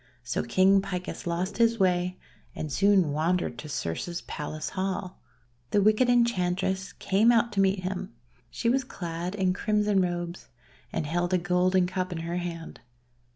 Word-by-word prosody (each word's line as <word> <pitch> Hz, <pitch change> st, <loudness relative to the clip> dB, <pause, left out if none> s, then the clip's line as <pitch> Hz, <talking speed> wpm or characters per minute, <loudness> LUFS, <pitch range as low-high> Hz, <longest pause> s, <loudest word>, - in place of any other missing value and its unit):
So 125 Hz, +1 st, -1 dB
King 190 Hz, +10 st, +4 dB
Picus 180 Hz, -2 st, -5 dB
lost 180 Hz, +5 st, -2 dB
his 230 Hz, 0 st, +4 dB
way, 180 Hz, -1 st, +1 dB, 0.4 s
and 155 Hz, -, -4 dB
soon 190 Hz, +1 st, +3 dB
wandered 160 Hz, -4 st, 0 dB
to 150 Hz, -, -7 dB
Circe's 150 Hz, -, -3 dB
Palace 155 Hz, +1 st, -5 dB
hall. 185 Hz, -1 st, -3 dB, 0.5 s
The 205 Hz, -, +3 dB
wicked 215 Hz, +5 st, +4 dB
Enchantress 190 Hz, -5 st, +1 dB
came 210 Hz, +5 st, +3 dB
out 235 Hz, 0 st, +3 dB
to 200 Hz, -2 st, +1 dB
meet 190 Hz, 0 st, +2 dB
him. 185 Hz, +1 st, -4 dB, 0.4 s
She 120 Hz, -, -3 dB
was 265 Hz, +3 st, +3 dB
clad 175 Hz, -5 st, -5 dB
in 190 Hz, -2 st, +1 dB
crimson 210 Hz, 0 st, +1 dB
robes, 175 Hz, 0 st, -3 dB, 0.4 s
and 155 Hz, -, -2 dB
held 175 Hz, +4 st, 0 dB
a -, -, +4 dB
golden 180 Hz, +1 st, +2 dB
cup 185 Hz, 0 st, -3 dB
in 165 Hz, -2 st, -4 dB
her 170 Hz, +1 st, -3 dB
hand. 170 Hz, -2 st, -6 dB
185 Hz, 155 wpm, -27 LUFS, 175-195 Hz, 0.5 s, King